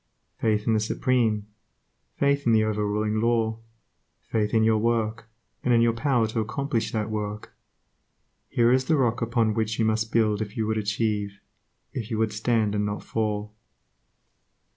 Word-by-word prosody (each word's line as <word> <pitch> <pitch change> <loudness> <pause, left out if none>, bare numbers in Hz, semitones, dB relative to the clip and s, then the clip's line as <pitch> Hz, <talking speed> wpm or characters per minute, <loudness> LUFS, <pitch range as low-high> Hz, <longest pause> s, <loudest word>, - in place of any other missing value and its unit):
Faith 105 -2 +1
in 115 - +2
the 110 - +3
Supreme; 110 -1 +1 0.7
faith 140 -1 +1
in 115 - +5
the 110 -1 +4
over 105 -1 0
ruling 105 +1 0
Law; 115 -1 +1 0.6
faith 105 -2 -1
in 110 -1 +3
your 110 -1 +3
work, 115 0 -1 0.3
and 125 -1 +3
in 115 - +4
your 115 0 +3
power 120 0 +1
to 115 - -2
accomplish 115 +2 -2
that 110 -1 -2
work, 105 0 -4 1.0
here 120 0 +3
is 130 +1 +3
the 155 +3 +2
rock 125 -2 +1
upon 115 -2 +1
which 110 0 -1
you 115 - +2
must 110 0 0
build 110 -2 +2
if 105 -1 -5
you 110 - 0
would 110 0 0
achieve, 105 -1 -1 0.5
if 115 -4 -4
you 110 - -2
would 110 -1 0
stand 110 -1 +1
and 105 0 0
not 105 0 -3
fall. 105 -1 -2
110 Hz, 170 wpm, -25 LUFS, 105-115 Hz, 1.0 s, in